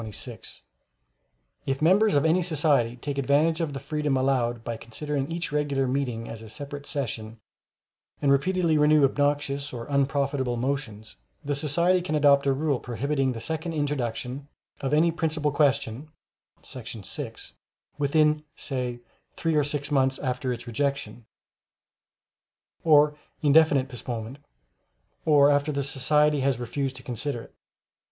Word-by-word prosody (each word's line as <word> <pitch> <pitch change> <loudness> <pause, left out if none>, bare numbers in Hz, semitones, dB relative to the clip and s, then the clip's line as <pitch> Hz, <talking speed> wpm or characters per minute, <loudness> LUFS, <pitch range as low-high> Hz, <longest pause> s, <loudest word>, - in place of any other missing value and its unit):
] - - -47
If 135 0 0
members 195 +6 +4
of 145 - +3
any 165 +3 +3
society 145 -8 +1
take 140 +2 -4
advantage 150 +5 +2
of 155 -3 -2
the 135 - -4
freedom 150 0 -1
allowed 125 -3 0
by 115 -1 -3
considering 140 +6 -4
each 170 0 -3
regular 145 -2 0
meeting 125 -4 -2
a 110 -1 -8
separate 145 +5 -7
session, 115 -5 -4 0.8
and 140 -2 +2
repeatedly 165 +2 +2
renew 150 0 +5
obnoxious 145 0 0
or 115 -2 -6
unprofitable 140 -2 0
motions, 120 -5 -4 0.3
the 145 - 0
society 170 +6 +2
can 175 -3 -2
adopt 140 -2 +4
a - - +4
rule 140 -1 0
prohibiting 135 +2 -1
the 115 - -6
second 160 +6 -3
introduction 135 -2 -3 0.3
of 135 - -2
any 160 +3 +4
principal 155 -2 -1
question 140 -1 0 0.5
[§ 115 -5 -8
6] - - -6 0.5
within, 150 +1 +2
say, 125 -3 -3 0.3
three 165 -1 -1
or 150 -1 +3
six 145 0 -3
months 135 -2 +2
after 125 -1 -2
its 120 -1 -5
rejection, 120 -2 -3 1.6
or 150 -2 +5 0.3
indefinite 145 -2 +5
postponement, 120 0 -6 0.9
or 145 -2 +6
after 145 +1 +2
the 140 -1 -1
society 150 +1 +2
has 135 -2 +1
refused 130 +3 -3
to 125 - -8
consider 125 0 -3
it. - - -17
140 Hz, 135 wpm, -26 LUFS, 125-150 Hz, 1.6 s, or